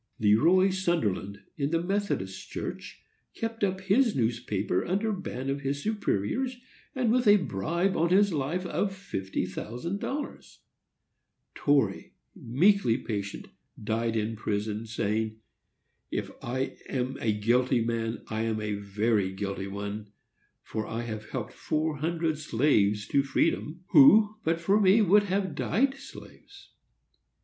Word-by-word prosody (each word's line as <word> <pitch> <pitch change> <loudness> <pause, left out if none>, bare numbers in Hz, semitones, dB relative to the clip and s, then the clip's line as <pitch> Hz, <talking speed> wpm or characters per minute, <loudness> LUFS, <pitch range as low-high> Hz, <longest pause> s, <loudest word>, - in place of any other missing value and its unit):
Le 105 -1 +4
Roy 185 - +4
Sunderland, 105 - -1
in 140 -1 0
the 165 +1 +1
Methodist 190 - -2
Church, - - -6 0.3
kept 225 -1 -4
up 190 -1 0
his 210 +5 +3
newspaper 110 -6 0
under 205 +4 0
ban 135 -9 -5
of 140 +1 -2
his 140 +1 -2
superiors, 220 - -1 0.4
and 250 -4 +1
with 245 -1 +2
a 205 - +9
bribe 170 - -1
on 170 +1 +2
his 200 +1 +4
life 155 +6 -1
of 195 +2 -1
fifty 95 - -3
thousand 120 - -5
dollars, 280 +5 -6 0.9
Torrey, 135 -9 +1 0.2
meekly 145 - +3
patient, 100 -6 -5 0.3
died 115 +1 -1
in 110 0 -1
a - - -7
prison, 105 +1 -3
saying, 110 0 -1 0.7
"If - - -3
I 130 +3 -3
am 130 +1 -2
a 110 - +2
guilty 120 +4 +2
man 115 -1 -2
I 110 0 -2
am 110 -1 -1
a 105 -1 -2
very 100 0 0
guilty 95 0 -4
one, 100 +1 -5 0.5
for 110 -1 -4
I 115 +1 -3
have 110 -2 -6
helped 125 -2 -5
four 155 0 -1
hundred 160 0 -1
slaves 110 -7 +2
to 140 - +3
freedom, 150 +4 -1
who 205 +7 +7
but 165 +1 +1
for 195 +5 +3
me 200 +3 +5
would 205 +2 +5
have 190 -3 -1
died 245 - +1
slaves." - - -13
135 Hz, 140 wpm, -28 LUFS, -, 0.9 s, a